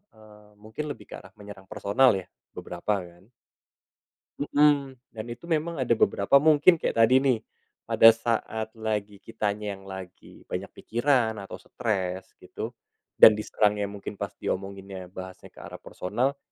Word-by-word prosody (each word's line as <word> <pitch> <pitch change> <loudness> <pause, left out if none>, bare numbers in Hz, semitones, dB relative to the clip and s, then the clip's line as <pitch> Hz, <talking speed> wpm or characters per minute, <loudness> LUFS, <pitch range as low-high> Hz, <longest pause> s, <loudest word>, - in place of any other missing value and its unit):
eee, 105 -1 -18
mungkin 110 +8 -6
lebih - - -10
ke - - -6
arah - - -16
menyerang 100 -2 -12
personal, 125 +6 +3
ya. 95 - -7 0.3
Beberapa, 100 +4 -2
kan. 90 +5 -17 1.1
Mhm. 145 -2 +2 0.2
Dan 110 -1 -7
itu 120 0 -8
memang 165 +1 0
ada 125 - -1
beberapa 100 +6 +4
mungkin 155 +3 +5
kayak - - -2
tadi, 125 +3 +5
nih. 130 -4 +2 0.4
Pada 115 - +5
saat 110 -1 -2
lagi 105 -2 -3
kitanya 105 -1 -3
yang 95 - -16
lagi 95 -1 -11
banyak - - -5
pikiran, 120 -2 0
atau 95 - -9
stres, 95 -5 -3
gitu, - - -7 0.5
dan 110 - +10
diserangnya 105 -1 0
mungkin 100 0 -8
pas - - -5
diomonginnya 95 -1 -5
bahasnya 95 0 -10
ke - - -16
arah - - -9
personal, 125 +9 -2
105 Hz, 145 wpm, -26 LUFS, 100-125 Hz, 1.1 s, dan